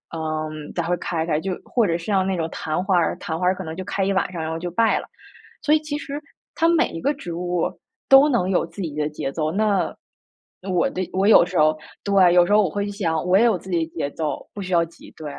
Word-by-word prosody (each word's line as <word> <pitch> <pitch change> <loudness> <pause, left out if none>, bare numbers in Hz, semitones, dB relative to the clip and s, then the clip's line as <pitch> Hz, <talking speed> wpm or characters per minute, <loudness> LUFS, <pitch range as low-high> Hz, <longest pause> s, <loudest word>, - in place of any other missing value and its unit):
嗯， 155 -1 -4
才 170 - 0
会 175 +2 0
开 160 -2 -2
开。 155 -2 0
就 190 +3 -3
或 235 -3 +1
者 165 -1 0
是 170 - -10
像 195 -2 +2
那 190 0 0
种 165 -2 -2
昙 155 +3 -2
花 190 -1 +2
儿， 170 - +1
昙 160 +1 -4
花 180 - -1
儿 185 +1 +3
可 190 - -6
能 160 -2 -6
就 185 - -5
开 200 0 -1
一 195 - +1
晚 190 - 0
上 170 - -4
然 160 0 -3
后 160 - -3
就 175 +1 -4
败 225 +6 +2
了。 - - -8 0.6
所 300 - +2
以 - - +3
其 300 -1 -4
实 295 -1 -6 0.3
它 330 - +2
每 340 -1 +3
一 165 - -7
个 285 - +1
植 225 -12 -7
物， 175 0 -1 0.4
都 270 +2 +7
能 235 -9 +1
有 180 - +1
自 165 +4 -9
己 160 -5 -4
的 150 0 -1
节 145 -2 -4
奏。 155 +1 -1
那 205 +1 +1 0.8
我 180 -1 +2
的 185 -1 -3
我 190 +2 +2
有 215 - +8
时 180 0 -4
候 155 +1 +4 0.3
对， 195 -3 +5
有 175 0 +6
时 205 - +1
候 210 - +6
我 190 - +1
会 200 +5 -2
想 165 -6 -1
我 180 +1 +4
也 220 - +5
有 225 -5 +3
自 190 - -12
己 170 -2 +1
的 - - -23
节 145 -3 -2
奏， 155 0 -4
不 205 - -6
需 185 -1 -4
要 170 -1 +4
急， 170 0 -16
对。 155 - -9
180 Hz, 290 characters per minute, -22 LUFS, 160-200 Hz, 0.8 s, 有